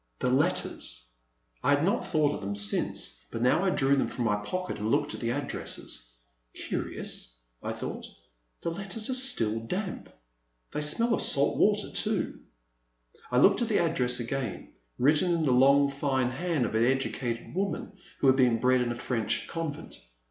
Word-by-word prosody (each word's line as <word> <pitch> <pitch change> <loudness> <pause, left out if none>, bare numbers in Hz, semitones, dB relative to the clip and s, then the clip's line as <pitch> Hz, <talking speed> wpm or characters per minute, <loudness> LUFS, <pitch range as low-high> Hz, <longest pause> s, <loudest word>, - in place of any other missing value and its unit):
The 125 - 0
letters! 140 - 0 0.5
I 145 - +5
had 145 - -1
not 195 - +1
thought 150 -2 +2
of - - -6
them 100 0 -3
since, 100 -10 -1
but 115 0 -3
now 130 +8 +3
I 195 - +3
drew 140 -5 +3
them 135 - +1
from 120 - -3
my 105 -2 +2
pocket 180 +13 -4
and 105 +1 -2
looked - - +1
at - - -6
the 115 - -2
addresses. 120 - -4 0.4
Curious/* - - -4 0.3
I - - -3
thought, - - -6 0.5
'*the 170 - -2
letters 200 +6 -3
are - - +1
still 115 - +2
damp; 180 - -4 0.6
they 150 - -2
smell 230 +11 +2
of - - +1
salt 140 +1 +3
water 210 0 +3
too.'* 215 -3 -1 0.9
I 125 - 0
looked 195 - +5
at 235 - +1
the 215 - +2
address 125 -7 +1
again, 120 -2 -4 0.2
written 150 +7 +3
in 170 -2 +1
the 140 - +2
long 140 +3 +5
fine 135 -2 0
hand 150 -1 -1
of 110 - -4
an 110 +1 +3
educated 125 -2 -1
woman 195 +3 -2 0.3
who - - +2
had 130 -1 +6
been 125 -3 +4
bred 130 +1 +3
in 120 -1 0
a - - -3
French 115 -2 -2
convent. 160 -2 -5
135 Hz, 175 wpm, -28 LUFS, 120-175 Hz, 0.9 s, had